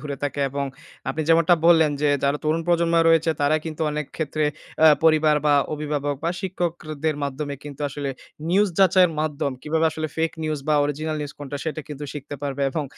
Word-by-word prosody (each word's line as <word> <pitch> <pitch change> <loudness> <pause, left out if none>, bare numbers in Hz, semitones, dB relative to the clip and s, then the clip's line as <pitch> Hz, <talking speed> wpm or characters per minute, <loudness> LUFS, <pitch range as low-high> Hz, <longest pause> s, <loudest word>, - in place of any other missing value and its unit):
দূরে 145 -2 -5
থাকে 145 0 -2
এবং 140 +1 -2 0.4
আপনি 150 +4 -1
যেমনটা 165 +1 +5
বললেন 160 -3 +6
যে 150 - +4
যারা 140 +1 +1
তরুণ 160 +2 +1
প্রজন্ম 170 -1 +2
রয়েছে 165 0 +4
তারা 145 +2 +3
কিন্তু 160 0 -4
অনেক 150 -1 -3
ক্ষেত্রে 155 -1 -1 0.4
অ্যা 160 - +8 0.2
পরিবার 155 -1 +5
বা 145 - +5 0.2
অভিভাবক 145 -1 -2
বা 170 - +1
শিক্ষকদের 165 -5 -2
মাধ্যমে 140 +1 -3
কিন্তু 145 -1 -9
আসলে 140 0 -4 0.4
নিউজ 200 +3 +4
যাচাইয়ের 185 -2 +5
মাধ্যম 145 -3 -1
কিভাবে 160 +1 0
আসলে 155 0 -3
ফেইক 160 0 0
নিউজ 155 -1 -1
বা 155 - +4
অরিজিনাল 155 +2 -2
নিউজ 145 0 -5
কোনটা 145 0 -6
সেটা 160 -1 -3
কিন্তু 150 -1 -6
শিখতে 145 0 -7
পারবে 140 0 -2
এবং 150 +1 -2
155 Hz, 185 wpm, -23 LUFS, 145-160 Hz, 0.4 s, অ্যা